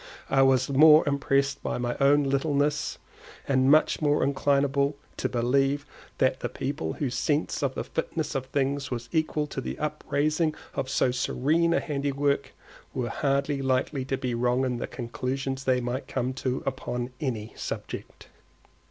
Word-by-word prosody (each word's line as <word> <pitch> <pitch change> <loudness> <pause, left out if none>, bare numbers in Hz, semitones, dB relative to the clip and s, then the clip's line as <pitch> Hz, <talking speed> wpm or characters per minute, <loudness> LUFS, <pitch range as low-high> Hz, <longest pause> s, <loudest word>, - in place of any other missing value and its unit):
I 135 - +5
was 130 -1 +4
more 150 +3 +7
impressed 140 0 +1
with - - -2
my 120 0 -1
own 145 +1 +5
littleness, 145 +1 0 0.5
and 130 -1 +3
much 155 +2 +4
more 145 -1 +2
inclinable 140 0 +2 0.2
to - - -1
believe 135 +4 +1 0.3
that 130 0 +2
the - - -3
people 130 - -3
whose 130 -4 -2
sense 145 +5 0
of 135 -2 -1
the - - -2
fitness 160 -1 -3
of 130 -1 -3
things 140 0 -1
was 120 -1 -5
equal 155 -2 0
to 135 -2 -5
the - - -5
upraising 150 +1 0 0.2
of 130 - -3
so 135 -1 +2
serene 155 +6 +1
a 170 - +3
handiwork, 140 -2 -1 0.4
were 120 -2 -1
hardly 140 +1 0
likely 130 +1 0
to 135 0 -1
be 130 -2 -2
wrong 125 +2 +1
in 125 -2 -1
the - - -4
conclusions 135 +2 -4
they 130 -1 +3
might 125 +2 -3
come 125 +2 -2
to 130 -1 -2
upon 125 -2 -3
any 115 -6 -3
subject. - - -6
135 Hz, 160 wpm, -27 LUFS, 130-145 Hz, 0.5 s, more